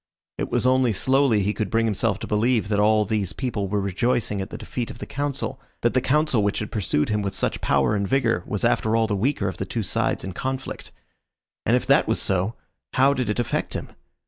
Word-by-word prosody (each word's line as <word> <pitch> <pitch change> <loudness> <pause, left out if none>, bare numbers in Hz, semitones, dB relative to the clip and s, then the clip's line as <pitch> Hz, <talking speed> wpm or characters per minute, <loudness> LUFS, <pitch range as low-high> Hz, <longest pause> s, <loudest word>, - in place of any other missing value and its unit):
It - - -2
was - - 0
only 130 -2 +3
slowly 130 -1 +3
he 105 +2 0
could 110 -3 -2
bring 115 +2 +2
himself 105 -1 +1
to - - -6
believe 110 0 +1
that 105 -1 +1
all 105 0 +4
these 105 -4 -1
people 115 -7 -2
were 105 +2 0
rejoicing 100 +1 0
at 95 - -5
the - - -7
defeat 120 -2 -4
of - - -8
the - - -6
Council, 140 -1 -3 0.2
that 120 - +2
the 130 - +3
Council 150 -4 +2
which 100 0 0
had 105 - -4
pursued 90 -8 0
him 105 -1 +1
with 100 -1 -3
such - - -1
power 70 +7 +2
and 100 -1 -1
vigour 120 -7 +1
was - - -1
after 110 0 +2
all 115 0 +3
the 105 -2 -1
weaker 105 0 0
of 95 - -4
the 95 - -3
two 115 +3 -2
sides 90 - 0
in 95 - -4
conflict. 130 +4 -4 0.8
And - - +4
if - - 0
that - - +4
was - - +1
so, 95 +4 0 0.4
how 135 +2 +4
did 130 -5 -2
it 105 - -1
affect 120 - -1
him? - - -5
110 Hz, 230 wpm, -24 LUFS, 100-125 Hz, 0.8 s, all